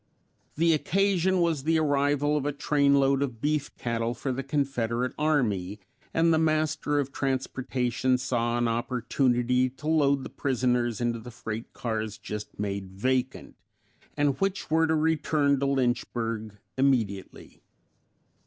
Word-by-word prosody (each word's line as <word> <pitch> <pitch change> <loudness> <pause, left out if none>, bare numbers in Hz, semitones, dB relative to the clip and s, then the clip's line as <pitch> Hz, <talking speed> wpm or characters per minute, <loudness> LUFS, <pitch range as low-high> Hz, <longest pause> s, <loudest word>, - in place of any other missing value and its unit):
The 165 +2 +3
occasion 190 +2 +2
was 165 -4 +1
the 160 +3 +2
arrival 145 -1 +2
of 150 - 0
a - - +1
trainload 140 -1 +2
of 125 -5 -2
beef 150 +2 0
cattle 115 0 -2
for 130 +4 -3
the 130 +1 -2
Confederate 125 -3 -1
army, 110 -11 0 0.3
and 165 0 +3
the 160 - +3
master 155 -2 +1
of 140 -1 -2
transportation 130 -2 -1
saw 120 -1 -1
an 120 0 +1
opportunity 125 +1 +1
to 135 +4 -10
load 140 -4 +3
the - - -7
prisoners 125 -3 0
into 120 -1 0
the 115 +2 -9
freight 110 -1 -6
cars 110 -3 -3
just 105 -1 -7
made 100 -1 -3
vacant 130 +6 -2 0.6
and 145 0 +1
which 195 -4 -1
were 160 +1 +4
to 160 - +2
return 155 -3 +2
to 140 - 0
Lynchburg 115 -5 -1 0.2
immediately. 115 -8 -1
130 Hz, 135 wpm, -27 LUFS, 120-150 Hz, 0.6 s, were